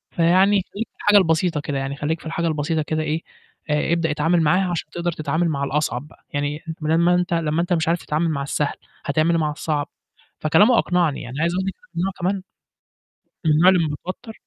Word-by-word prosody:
فيعني 185 +4 +4
خلّيك 225 +3 -3
في - - -54
الحاجة 205 0 +5
البسيطة 165 -3 +2
كده 145 -1 -3
يعني، 135 +1 -3
خلّيك 155 +3 -2
في - - -16
الحاجة 165 +1 -1
البسيطة 155 +1 0
كده 155 +1 -2
إيه 155 +2 -1 0.5
آآ، 150 +2 +1
ابدأ 165 -2 +1
اتعامل 160 +3 +2
معاها 180 +4 +2
عشان 170 - -3
تقدر 175 0 -2
تتعامل 160 +2 -1
مع 140 -2 -2
الأصعب 140 -1 -1
بقى، - - -22
يعني 145 +1 -2
أنت 160 -1 -7
بدال 160 +2 +2
ما 175 +1 +4
أنت 180 -1 0
لمّا 165 0 +1
أنت 175 +1 0
مش 160 -1 0
عارف 170 +1 +2
تتعامل 160 +2 0
مع 140 -3 -2
السهل، 145 +1 -1 0.3
هتعمل 155 +4 +2
إيه 165 - +2
مع 155 -2 0
الصعب؟" 150 -2 -2 0.5
فكلامه 210 +10 +4
أقنعني 175 -5 +1
يعني 130 +4 -5
عايز 170 +1 +1
أقول 190 +1 -1
لِك 195 - -2 0.2
إن - - +1
أنا 195 - 0
كمان 190 +2 0 1.1
من - - +4
النوع 165 +5 +5
اللي 185 -1 +6
لما 145 -1 -2
باتوتّر 220 +5 -6
160 Hz, 220 wpm, -22 LUFS, 150-175 Hz, 1.1 s, اللي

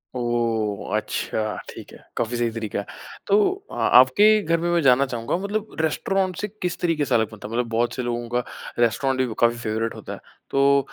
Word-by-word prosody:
ओह! 115 -4 -1
अच्छा, 110 -1 -2
ठीक - - -10
है। - - -13 0.2
काफ़ी 120 +1 -1
सही 120 -1 0
तरीका 110 -3 -4
है, 100 - -5 0.4
तो 200 +1 +4 0.3
अ, - - -7
आपके 205 - +5
घर 165 -1 +2
में 175 +1 -1
मैं 170 -1 +2
जानना 135 0 +5
चाहूँगा 120 +5 -2
मतलब 215 +2 -3
रेस्टोरेंट 185 +3 0
से 210 - -1
किस 180 -1 -2
तरीके 165 -4 +1
से - - +1
अलग 110 -1 +1
बनता 105 -1 -9
है? 115 - -8
मतलब 120 -1 -1
बहुत 115 +1 0
से 130 - -2
लोगों 120 0 -3
का 120 +1 0 0.4
रेस्टोरेंट 130 +3 +2
ही - - -4
काफ़ी 120 0 +3
फेवरेट 115 0 -2
होता - - -7
है। - - -8 0.3
तो 140 0 +4
120 Hz, 205 wpm, -23 LUFS, 115-160 Hz, 0.4 s, आपके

